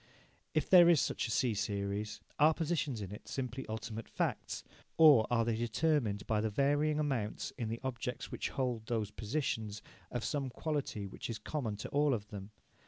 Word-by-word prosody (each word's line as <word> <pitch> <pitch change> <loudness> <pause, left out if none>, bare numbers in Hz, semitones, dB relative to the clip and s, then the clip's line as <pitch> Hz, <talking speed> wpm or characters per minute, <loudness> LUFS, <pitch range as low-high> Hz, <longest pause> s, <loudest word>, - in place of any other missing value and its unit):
If 155 - +2
there 175 -2 +8
is 170 -4 +6
such - - 0
a - - -4
C 125 -1 +2
series, 100 0 -2 0.2
are 155 +2 +6
positions 155 -7 -1
in 95 - -7
it 105 - -9
simply 130 -1 -4
ultimate 110 0 -5
facts, - - -2 0.3
or 150 -9 +8
are 115 -1 +2
they 115 -1 +1
determined 115 -2 0
by 110 -1 +1
the 110 - 0
varying 145 +6 +2
amounts, 135 -8 -2
in 115 -4 -3
the 115 +1 -3
objects 125 0 -4
which - - -2
hold 125 -5 -2
those 110 -3 -1
positions, 110 -3 -2 0.3
of 120 -2 -3
some 140 -3 -1
quality 145 -7 -3
which 95 - -7
is 115 - -3
common 110 -1 -3
to 105 - -6
all 145 -2 +3
of 105 -2 -7
them? 100 -1 -7
120 Hz, 180 wpm, -34 LUFS, 105-145 Hz, 0.3 s, there